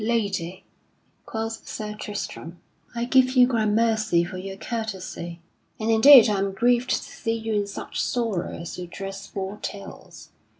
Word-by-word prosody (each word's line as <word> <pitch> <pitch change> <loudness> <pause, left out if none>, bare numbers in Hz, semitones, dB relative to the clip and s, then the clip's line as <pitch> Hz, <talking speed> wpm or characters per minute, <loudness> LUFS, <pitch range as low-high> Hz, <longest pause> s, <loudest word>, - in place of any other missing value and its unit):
"Lady," 200 -6 -1 0.6
quoth 225 0 -4
Sir 210 -1 -5
Tristram, 200 -5 -6 0.4
"I 235 0 -1
give 255 0 +4
you 250 -1 +8
gramercy 220 -5 +2
for 185 +2 -6
your 195 +1 -7
courtesy. 190 -7 -5 0.4
And 220 +1 0
indeed 245 +2 +9
I 205 -2 +1
am 195 0 -1
grieved 240 +4 +2
to - - +3
see 225 0 -3
you 225 -1 -3
in 205 -1 0
such 200 - -5
sorrow 225 -7 -1
as 170 +2 -7
your 180 - -6
dress 195 +2 -7
foretells. 195 0 -7
210 Hz, 145 wpm, -25 LUFS, 195-230 Hz, 0.6 s, indeed